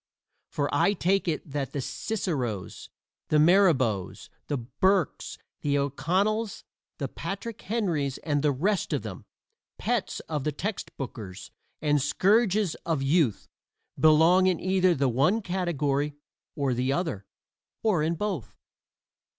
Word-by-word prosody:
For - - -1
I 200 - +3
take 195 0 +1
it 160 -1 -2
that 135 -3 -3
the 145 - -2
Ciceros, 135 - -3 0.4
the 155 - +2
Mirabeaus, 150 - +3 0.2
the 145 - -1
Burkes, 145 +9 0 0.2
the 145 -1 +1
O'Connells, 185 - 0 0.3
the - - -2
Patrick 200 +3 -6
Henrys 170 - -1
and 145 -3 0
the 150 0 +3
rest 185 +9 0
of - - -1
them - - -7 0.5
pets 235 -3 -1
of 150 -4 -4
the 150 - 0
text 195 +8 -4
bookers 105 -8 -7 0.3
and 150 -1 +3
scourges 200 - +2
of 160 -5 -1
youth 140 - +2 0.5
belong 165 +4 +6
in 180 -3 +2
either 185 -1 +3
the 140 -1 +1
one 140 - +2
category 150 -7 -1 0.4
or 140 -3 0
the 125 +2 0
other, 140 - -2 0.6
or 210 -8 +2
in 160 +2 +1
both. 190 - -3
155 Hz, 130 wpm, -27 LUFS, 140-190 Hz, 0.6 s, belong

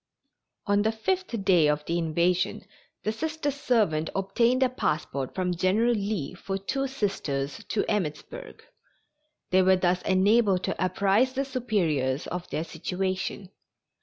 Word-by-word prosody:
On 205 0 +3
the 220 +1 +2
fifth 230 - -2
day 175 -6 +5
of 150 0 0
the 170 +1 0
invasion 170 +3 0 0.4
the 215 - 0
Sister 305 +4 -2
servant 225 - +1
obtained 235 +7 +2
a - - +4
passport 150 - -2
from 180 -1 0
General 200 +7 +2
Lee 200 -8 -2
for 195 +2 -4
two 270 +8 -2
Sisters 155 - -3
to 215 - -1
Emmittsburg. 210 - -4 0.9
They 185 +1 +5
were 190 0 +5
thus 180 0 +1
enabled 195 0 +3
to - - -1
apprise 200 +7 +2
the 275 +1 -1
Superiors 170 - 0
of 180 0 -5
their 155 - -2
situation. 185 +3 -3
195 Hz, 135 wpm, -27 LUFS, 175-230 Hz, 0.9 s, day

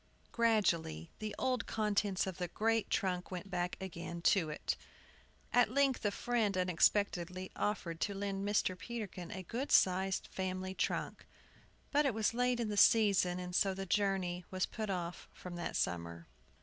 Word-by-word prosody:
Gradually 175 - +1
the 215 -1 -4
old 255 -1 0
contents 205 -3 +1
of 190 -2 -5
the 180 - -1
great 225 +5 0
trunk 180 -3 0
went 190 +1 -6
back 180 -1 -1
again 170 -2 -6
to 170 -5 +4
it. 150 - -2 0.8
At 245 -3 +5
length 275 +1 +2
a 205 - +3
friend 215 -2 0
unexpectedly 185 0 +1
offered 170 -6 -2
to 200 - 0
lend 195 0 -2
Mr. 205 -2 +1
Peterkin 185 -2 -6
a 190 -3 -6
good 245 - -4
sized 190 +1 +3
family 185 0 -3
trunk. - - -2 0.6
But 290 0 +3
it 250 - 0
was 220 0 +1
late 245 0 +1
in 230 -2 -1
the 205 - -2
season, 200 -5 +5
and 180 0 -6
so 195 -1 +3
the 195 0 -4
journey 190 -2 0
was 185 -1 0
put 215 -2 -5
off 175 -2 -4
from 180 -1 -8
that 175 - -4
summer. 85 -1 -2
195 Hz, 160 wpm, -34 LUFS, 180-215 Hz, 0.8 s, At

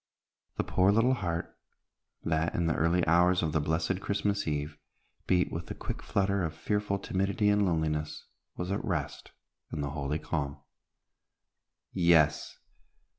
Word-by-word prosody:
The - - +1
poor 95 +2 +3
little 115 +5 +4
heart, 85 -8 -3 0.7
that 80 +1 0
in 85 - +1
the 80 - +2
early 85 +3 +2
hours 90 +2 +4
of 80 - 0
the 80 - +1
blessed 80 +5 -1
Christmas 100 -1 -1
Eve 75 0 -3 0.5
beat 90 0 +2
with 80 0 -5
the - - -6
quick - - -5
flutter 100 -1 0
of 80 -1 -3
fearful 105 +2 -1
timidity 100 +2 0
and 105 -1 +3
loneliness, 80 -2 -1 0.3
was 90 +1 -3
at 100 - -1
rest 75 -8 -3 0.4
in 75 - -3
the 70 -1 -2
holy 70 +1 -2
calm. 75 -2 -3 1.4
Yes! 85 -4 +3
85 Hz, 145 wpm, -30 LUFS, 80-95 Hz, 1.4 s, little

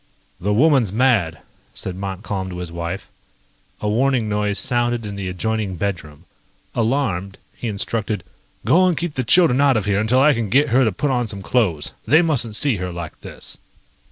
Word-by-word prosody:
"The 100 +3 -1
woman's 130 - +4
mad," 105 -9 +2 0.4
said 90 - -5
Montcalm 95 0 -4
to 90 - -6
his 90 -2 -6
wife. 85 0 -5 0.7
A 105 - -1
warning 120 +1 +2
noise 105 -1 0
sounded 120 +2 0
in 100 -1 -5
the 95 -2 -4
adjoining 105 +1 -2
bedroom. 85 -4 -4 0.5
Alarmed, 110 -6 -1 0.2
he 120 - -5
instructed: 105 -1 -2 0.4
"Go 185 +3 +5
and 175 -4 +1
keep 175 -3 -2
the 130 - -1
children 140 0 +4
out 140 -4 +4
of 105 - -1
here 100 -1 +1
until 110 +4 +2
I 150 +3 +6
can 115 -4 -2
get 140 +7 +3
her 130 +3 +4
to 110 - +2
put 140 +9 -1
on 125 -2 0
some 100 -2 -6
clothes. 95 -13 0
They 155 +4 +6
mustn't 125 -9 0
see 135 -2 +2
her 90 0 -4
like 85 -2 -7
this." - - -7
110 Hz, 185 wpm, -21 LUFS, 95-130 Hz, 0.7 s, I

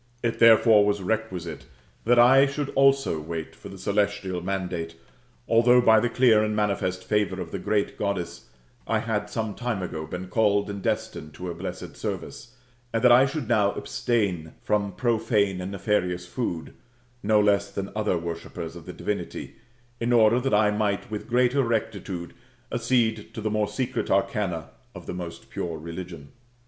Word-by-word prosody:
It 115 -1 -1
therefore 115 -2 +7
was 105 0 +1
requisite 95 -5 -3 0.4
that 120 +2 +4
I 130 +3 +7
should 140 +1 -3
also 135 -10 +3
wait 80 +1 -6
for - - -11
the 95 - -10
celestial 100 -2 -1
mandate, 90 -3 -3 0.5
although 120 +2 +5
by 110 -2 +6
the 120 +2 0
clear 115 -4 +4
and 105 0 -1
manifest 100 -3 -1
favour 105 -1 0
of - - -6
the - - -4
Goddess, 100 -3 -2 0.4
I - - +2
had - - -2
some 110 -2 -3
time 120 -5 -3
ago 80 -3 -5
been 90 +1 -5
called 100 +1 +1
and 100 -1 -6
destined 75 -4 -3
to 90 - -7
her 90 - -3
blessed 85 +3 -7
service; 120 +1 -6 0.4
and 115 +1 -1
that 125 - +7
I 130 +3 +7
should 135 -3 -4
now 105 -4 +3
abstain 95 -9 -2
from 100 -2 0
profane 110 -5 +1
and 90 +2 -5
nefarious 90 -3 -1
food, 90 -5 -4 0.5
no 105 +1 +3
less 100 -1 +2
than 100 0 -5
other 105 -4 +1
worshippers 85 0 -6
of 85 - -11
the - - -6
divinity, - - -4 0.4
in 120 +1 0
order 115 0 +5
that 135 +1 -1
I 105 0 +4
might 105 +1 -1
with 105 - -5
greater 125 +3 +3
rectitude 105 -7 -3 0.4
accede 115 -3 0
to - - -4
the 110 0 -2
more 105 -1 +1
secret 125 +5 -3
arcana 95 -4 0 0.2
of - - -9
the - - -5
most 90 -2 -8
pure 85 -2 -4
rtUgion. 85 -2 -8
105 Hz, 165 wpm, -25 LUFS, 90-115 Hz, 0.5 s, therefore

